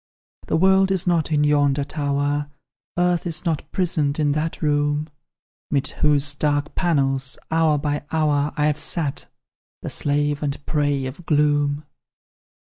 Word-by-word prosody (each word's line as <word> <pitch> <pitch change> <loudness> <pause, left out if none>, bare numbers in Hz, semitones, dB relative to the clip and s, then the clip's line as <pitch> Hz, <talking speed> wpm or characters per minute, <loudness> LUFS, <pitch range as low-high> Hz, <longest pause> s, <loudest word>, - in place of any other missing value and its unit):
"The - - +1
world 190 +2 +4
is 190 -2 0
not 170 -3 +1
in 150 -1 +3
yonder 145 -1 +2
tower, 145 0 -1 0.5
Earth 175 0 +1
is 170 +2 -2
not 160 -3 -2
prisoned 155 -6 0
in 150 -1 +2
that 155 +2 -2
room, 145 +1 +1 0.6
'Mid 140 -2 0
whose 145 -2 +3
dark 145 0 -1
panels, 135 -6 0
hour 160 -2 +3
by 145 0 -2
hour, 150 -2 +1
I've 150 0 +1
sat, 150 -6 -2 0.6
the - - -4
slave 145 0 0
and 145 -1 -3
prey 145 -3 0
of 145 +7 -8
gloom. 145 -1 +2
150 Hz, 135 wpm, -22 LUFS, 145-160 Hz, 0.6 s, world